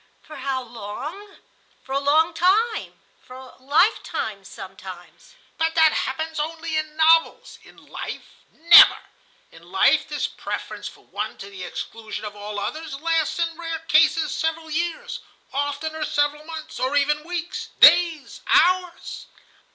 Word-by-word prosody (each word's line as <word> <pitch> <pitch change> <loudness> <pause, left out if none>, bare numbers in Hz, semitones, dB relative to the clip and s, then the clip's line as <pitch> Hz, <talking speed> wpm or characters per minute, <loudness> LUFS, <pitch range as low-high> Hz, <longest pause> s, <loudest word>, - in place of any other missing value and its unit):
"For 310 - -11
how 265 -1 -3
long? 250 - -8 0.5
For 265 - -13
a 275 - +1
long 300 +3 +2
time, 430 +6 +1 0.2
for 255 - -13
a 260 0 -12
life 280 +3 +3
time 215 - -5
sometimes." 190 - -12 0.2
"But 325 0 0
that 320 -1 +5
happens 315 +4 -3
only 325 +1 -3
in 310 0 -3
novels. 325 +9 +3
In - - -18
life, - - -8 0.3
never. 340 +2 +8 0.5
In - - -17
life - - +3
this - - -2
preference - - -6
for - - -14
one - - -5
to 200 +1 -10
the 190 -2 -8
exclusion 220 +4 -7
of 205 0 -7
all 205 0 -6
others 305 +5 -5
lasts 325 -1 0
in 335 -1 -1
rare 330 -1 -5
cases 315 +1 +3
several 320 0 -3
years, 335 +1 -3 0.3
oftener 285 +3 -3
several 295 0 -1
months, 320 -1 -8
or 260 +3 -1
even 295 +1 +1
weeks, 345 +1 -5
days, 335 -4 +5
hours. 360 -1 +1
310 Hz, 145 wpm, -23 LUFS, 265-330 Hz, 0.5 s, never